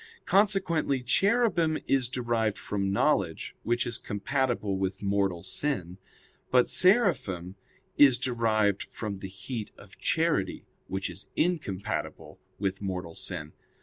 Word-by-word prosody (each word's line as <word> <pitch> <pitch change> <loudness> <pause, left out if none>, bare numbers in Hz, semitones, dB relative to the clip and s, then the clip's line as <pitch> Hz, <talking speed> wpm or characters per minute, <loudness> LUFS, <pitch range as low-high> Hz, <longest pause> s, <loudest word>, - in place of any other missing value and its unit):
Consequently 185 -9 +2
Cherubim 190 - +2
is 130 -3 +2
derived 120 -4 0
from 100 -1 -2
knowledge; 100 - +1
which 120 +2 0
is 120 -2 -2
compatible 105 -2 -1
with 95 +1 -2
mortal 100 -3 0
sin; 95 - -3 0.5
but 125 -1 +4
Seraphim 165 - +3 0.5
is 135 -4 +8
derived 110 -6 +1
from 105 -3 -5
the 95 - -6
heat 105 +4 -6
of - - -16
charity, - - 0 0.2
which 95 0 -2
is 90 +1 -9
incompatible 105 - -2 0.2
with 95 -1 -2
mortal 90 -4 -4
sin. 80 -5 -5
110 Hz, 115 wpm, -28 LUFS, 95-135 Hz, 0.5 s, is